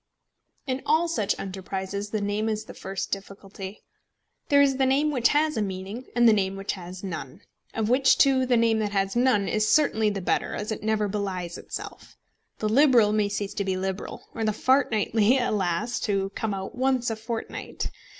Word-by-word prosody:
In 260 -1 -2
all 315 +3 +2
such 220 -12 0
enterprises 190 +1 -4
the 215 0 -2
name 205 +2 -1
is 215 0 -2
the - - -10
first 195 0 -5
great 195 - -1
difficulty. 195 0 -10 0.7
There 285 - +5
is 270 -2 +2
the 265 - +3
name 285 +3 +2
which 250 -5 +3
has 305 -1 +1
a - - +1
meaning 195 +5 -5
and 240 -1 +5
the 225 - +7
name 195 -2 0
which 195 0 -3
has 185 0 -8
none, 160 -9 -6 0.3
of 220 -1 0
which 260 +3 +4
two 265 -2 +4
the 245 -1 +3
name 230 -1 +3
that 210 -1 -2
has 195 0 0
none 240 -5 +3
is 215 0 +1
certainly 220 -8 +3
the 200 -1 -3
better, 180 - -1
as 210 +1 -4
it 220 - -4
never 215 -1 +1
belies 190 -4 -3
itself. - - -8 0.4
The 215 - -1
Liberal 240 -4 +5
may 210 -1 +2
cease 205 0 -3
to 200 - -2
be 190 -1 -1
liberal, 190 +1 -5
or 225 - -3
The 215 -1 +1
Fortnightly, 225 -2 +2
alas! 210 -2 0
to 195 -2 -1
come 210 -1 -2
out 190 0 -6
once 255 -2 +1
a - - -2
fortnight. 225 +1 -5
215 Hz, 195 wpm, -26 LUFS, 195-245 Hz, 0.7 s, the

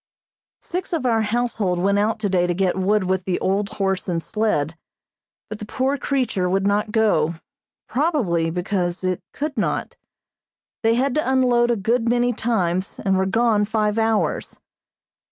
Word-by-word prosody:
Six 360 +1 -4
of 310 -6 -1
our 225 -2 +3
household 220 -4 0
went 200 +3 +2
out 215 +2 +1
today 190 -4 +1
to 175 - 0
get 185 -1 +1
wood 195 +2 +2
with 185 0 -1
the 180 -2 -1
old 200 +2 0
horse 190 -2 -2
and 170 -2 0
sled, 165 -6 -1 0.7
but 215 - -7
the 210 - -6
poor 265 +4 0
creature 250 -9 -1
would 195 +1 +1
not 205 +1 +1
go, 175 -8 +2 0.5
probably 235 - +1
because 180 +1 -2
it 185 -1 -1
could 300 +1 -4
not. - - -2 0.8
They 225 0 +3
had 260 +2 +1
to 305 -2 0
unload 245 -2 +3
a 240 - +3
good 230 +3 0
many 245 0 +2
times 190 -5 -1
and 195 -1 +3
were 190 0 +1
gone 225 +1 +2
five 215 0 0
hours. 225 -1 0
210 Hz, 160 wpm, -22 LUFS, 185-240 Hz, 0.8 s, our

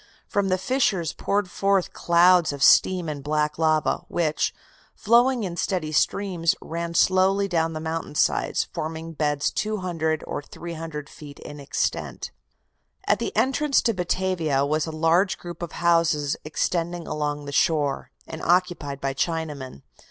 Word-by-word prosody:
From 200 -1 0
the 185 - +2
fissures 190 - 0
poured 200 -1 -1
forth 195 +1 0
clouds 175 -1 +4
of 140 -1 -3
steam 180 -3 +5
and 145 -2 -5
black 150 +1 -1
lava, 155 -1 +2
which, 155 -3 0 0.4
flowing 240 +2 +3
in 180 -3 -4
steady 175 -6 -1
streams, 175 +1 +1
ran 170 +1 -5
slowly 190 +2 +3
down 165 -3 0
the 155 - -4
mountain 160 -1 -4
sides, - - +1
forming 160 +1 -5
beds 150 -2 0
200 175 -7 -2
or - - -4
300 160 -2 -7
feet 145 -1 -12
in 145 0 -10
extent. 140 - -3 0.7
At - - +2
the - - -2
entrance 270 +5 +2
to 230 - +2
Batavia 175 -6 0
was 155 +2 0
a - - -4
large 165 +5 +2
group 175 -1 -9
of 170 -1 -5
houses 165 -4 +2
extending 170 +2 -2
along 150 -1 -3
the 140 - -6
shore, 145 -2 +1 0.2
and 160 - -8
occupied 175 -6 0
by 135 0 -1
Chinamen. 145 - -3
165 Hz, 145 wpm, -24 LUFS, 150-185 Hz, 0.7 s, steam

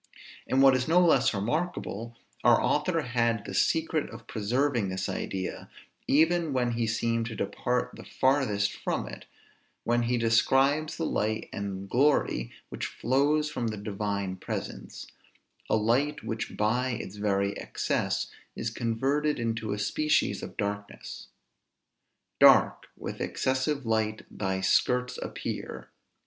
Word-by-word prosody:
And 135 +1 +3
what 135 -1 +7
is 130 0 0
no 170 +3 +5
less 160 -8 +4
remarkable, 115 - -3 0.3
our - - +6
author - - +1
had 115 -3 0
the 95 - -6
secret 160 +7 +1
of 110 0 -11
preserving 120 0 0
this 95 0 -2
idea, 95 -1 -4 0.4
even 160 +1 +3
when 125 -2 +1
he 115 -1 -1
seemed 115 +1 0
to 115 - -6
depart 125 +5 -1
the - - -10
farthest 130 -7 +1
from - - -3
it, - - -9 0.6
when 120 +1 +2
he 120 +1 +1
describes 135 +6 +3
the 165 - -1
light 110 -5 -1
and 100 -1 -4
glory 125 - +2 0.2
which - - -4
flows 145 +5 +1
from 120 -5 -2
the 110 -1 -3
Divine 100 -2 -3
presence; - - -6 0.6
a - - +3
light 125 +7 +1
which 110 -1 -4
by 120 +5 +1
its 105 -4 -5
very 100 -1 0
excess - - -1 0.2
is - - -3
converted 135 +6 0
into 115 -2 -2
a 105 - -1
species 150 +9 +1
of - - -8
darkness: 100 0 -5 1.1
"Dark - - +6
with - - -6
excessive 130 +1 -1
light 110 -1 0
thy 95 -2 -1
skirts 125 +6 +2
appear." - - -5
115 Hz, 135 wpm, -28 LUFS, 105-135 Hz, 1.1 s, what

